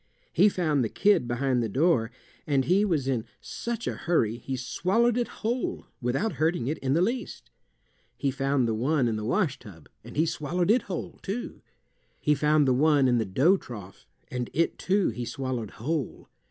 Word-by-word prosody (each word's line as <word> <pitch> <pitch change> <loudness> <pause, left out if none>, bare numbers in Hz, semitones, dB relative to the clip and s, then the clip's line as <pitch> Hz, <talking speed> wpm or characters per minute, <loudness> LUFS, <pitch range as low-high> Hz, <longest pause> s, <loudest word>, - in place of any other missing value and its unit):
He 195 +5 +6
found 155 -8 +1
the 110 - -1
kid 205 -11 +3
behind 125 +1 0
the 115 - -1
door, 130 - +2 0.4
and 135 -3 +2
he 185 +8 +3
was 160 -10 0
in 125 -5 0 0.2
such 230 - -5
a - - -1
hurry 120 -10 0
he 130 +2 -4
swallowed 195 - +1
it 240 -1 0
whole 240 +3 -3 0.2
without 135 - 0
hurting 160 -5 +1
it 150 +5 -2
in 135 0 0
the 170 - +3
least. 240 +5 -3 0.7
He 140 - 0
found 135 -1 +1
the 115 - 0
one 130 +4 +1
in 115 - 0
the 105 - -4
wash 145 - 0
tub, 85 -7 -13 0.2
and - - -10
he 160 - +4
swallowed 170 +4 0
it 245 +2 +4
whole, 180 - -5
too. 215 +5 -5 0.6
He 150 - +2
found 150 0 +3
the 130 - +4
one 145 0 +4
in 120 -1 +3
the 110 - 0
dough 135 - +3
trough, 105 - -11 0.2
and 125 -1 -3
it, 165 +2 0
too, 195 0 +2
he 120 - -4
swallowed 125 -3 -3
whole. 140 +4 -4
140 Hz, 190 wpm, -27 LUFS, 125-180 Hz, 0.7 s, He